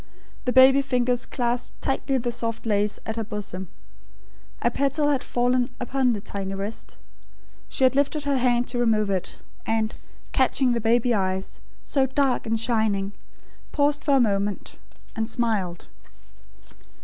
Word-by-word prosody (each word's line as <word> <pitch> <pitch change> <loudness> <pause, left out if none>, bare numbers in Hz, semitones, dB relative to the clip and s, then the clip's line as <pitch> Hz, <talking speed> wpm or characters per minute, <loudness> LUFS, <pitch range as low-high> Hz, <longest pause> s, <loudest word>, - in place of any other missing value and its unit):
The 250 - +1
baby 265 +2 +7
fingers 250 -2 0
clasped 240 -1 -2
tightly 270 0 0
the 240 -1 -2
soft 230 -1 -4
lace 205 -1 +1
at 220 0 -4
her 225 - -1
bosom. 205 -3 -5 1.0
A 240 - +3
petal 280 +3 +1
had 275 -3 +1
fallen 245 +1 +1
upon 255 +1 +1
the 225 -4 0
tiny 195 -1 -5
wrist. 200 +3 -6 0.7
She - - -1
had 260 0 +4
lifted 285 +1 +1
her 280 -2 +1
hand 245 -1 +2
to 245 - -1
remove 215 -4 +2
it; 185 -2 -2 0.3
and, 220 0 0 0.4
catching 260 0 +2
the 235 - -1
baby 235 +2 +3
eyes, 190 -2 -2 0.2
so 270 -2 +1
dark 265 -3 0
and 225 0 +1
shining, 220 -4 +1 0.6
paused 290 0 +1
for 280 - +3
a - - +5
moment, 205 -3 0 0.4
and 220 0 -2
smiled. 210 -8 -1
240 Hz, 150 wpm, -24 LUFS, 215-260 Hz, 1.0 s, baby